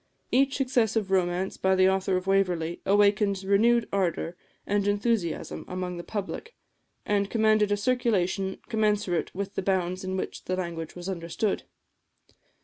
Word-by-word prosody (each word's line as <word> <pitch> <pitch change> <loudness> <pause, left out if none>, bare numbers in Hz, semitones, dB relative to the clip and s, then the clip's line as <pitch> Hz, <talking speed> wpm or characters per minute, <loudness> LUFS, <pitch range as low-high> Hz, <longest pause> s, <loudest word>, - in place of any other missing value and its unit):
Each 270 +1 +3
successive 225 -6 +1
romance 185 0 0
by 190 0 +2
the 185 0 +5
author 190 0 +1
of 185 - -4
"Waverley" 180 -4 +1
awakened 200 0 +3
renewed 225 +4 +3
ardour 175 -3 0 0.3
and 205 0 0
enthusiasm 205 -3 -1
among 180 -1 -4
the 175 - -6
public, 215 - -5 0.5
and 200 -1 +1
commanded 215 -2 +3
a 205 - +2
circulation 200 -5 0
commensurate 210 -7 0
with 200 +1 -4
the - - -2
bounds 185 -1 0
in 185 0 -2
which - - -5
the 185 - -1
language 170 -3 -5
was 175 0 -7
understood. 190 +3 -2
195 Hz, 145 wpm, -27 LUFS, 185-210 Hz, 0.5 s, the